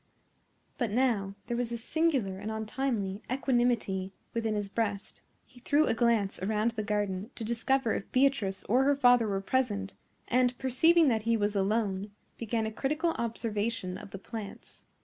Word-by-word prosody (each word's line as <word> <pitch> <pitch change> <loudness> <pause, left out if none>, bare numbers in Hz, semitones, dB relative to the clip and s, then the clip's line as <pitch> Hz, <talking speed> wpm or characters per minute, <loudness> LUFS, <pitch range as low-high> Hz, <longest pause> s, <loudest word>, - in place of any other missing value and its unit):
But 240 -4 0
now 210 -4 +1
there 240 - -2
was 240 -1 -2
a 235 - -2
singular 250 - 0
and 215 - -5
untimely 220 -2 -2
equanimity 240 -7 +1 0.2
within 225 -2 -1
his 205 -1 -2
breast. 205 -1 -3 0.2
He 255 - -18
threw 290 +5 +3
a - - +2
glance 225 -5 +1
around 215 +3 +1
the 220 -1 -3
garden 205 -1 -2
to 230 - -6
discover 235 +2 +1
if - - -5
Beatrice 255 -8 +2
or 250 +5 +3
her 285 0 +4
father 245 -4 +5
were 195 -1 -1
present, 205 -3 -1 0.3
and, 250 0 +2
perceiving 320 +6 +4
that 225 -3 +1
he 230 - +4
was 205 0 0
alone, 200 0 0 0.3
began 225 -1 -1
a 220 - -3
critical 305 +8 0
observation 220 -4 -2
of - - -10
the 195 - -7
plants. 205 +1 -9
225 Hz, 165 wpm, -30 LUFS, 205-250 Hz, 0.3 s, father